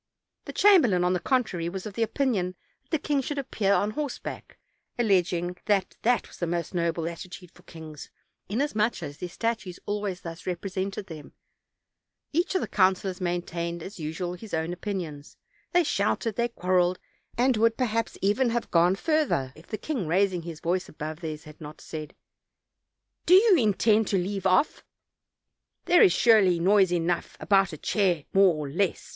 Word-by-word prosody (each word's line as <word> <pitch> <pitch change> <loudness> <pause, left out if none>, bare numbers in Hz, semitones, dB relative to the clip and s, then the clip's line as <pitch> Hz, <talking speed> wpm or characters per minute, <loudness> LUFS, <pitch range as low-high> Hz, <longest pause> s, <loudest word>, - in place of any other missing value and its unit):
The - - -7
chamberlain, 270 - +5
on 180 +1 +2
the 180 - 0
contrary, 185 -9 0
was 190 +1 -6
of 205 -2 -7
opinion 225 -5 0 0.3
that 265 - -41
the 320 - +1
king 290 -1 0
should 290 +2 -4
appear 220 -7 -1
on 205 +1 +2
horseback, 285 +3 -6 0.4
alleging 180 -5 +1
that 200 -3 +1
that 245 +1 +1
was - - -15
the 175 - -2
most 170 +2 -3
noble 170 -2 -1
attitude 175 +1 -8
for - - -20
kings, 155 -3 -11 0.4
inasmuch 220 - 0
as 145 -1 -7
their 180 - -5
statues 215 -2 -3
always 205 -3 -3
thus 165 +1 -9
represented 190 +2 -3
them; 160 -5 -10 1.0
each 345 +5 0
of 375 - +2
the - - -3
coun 190 -1 +4
cilors 185 0 -6
maintained 170 -1 -3
as 190 +1 -9
usual 165 +3 -4
his 200 +1 -6
own 160 +2 -2
opinions; 175 -6 -6 0.3
they 355 0 +4
shouted, 220 -4 0
they 235 0 +1
quarreled, 180 -4 +1 0.4
and 250 +1 +3
would 230 +1 +3
perhaps 230 -3 -1
even 220 +6 +2
have 235 0 -2
gone 175 +2 +4
further, 285 - 0
if 160 - -16
the 215 - -4
king, 240 - -3
raising 185 +1 +1
his 165 -2 -8
voice 180 +2 -1
above 155 +1 -6
theirs, 155 -3 -6
had 150 +1 -14
not 150 0 -9
said: 155 -2 -8 1.1
''Do 360 - +8
you 405 0 +7
intend 215 - +3
to 195 - +1
leave 190 +1 -1
off? 185 +11 +2 1.0
There 350 - +5
ia - - +8
surely 190 -2 +4
noise 190 +1 +4
enough 175 0 -1
about 195 -2 +3
a 155 - -7
chair 180 -3 +1
more 195 -3 +5
or 150 -1 -4
less! 175 +6 -1
190 Hz, 170 wpm, -27 LUFS, 170-225 Hz, 1.1 s, Do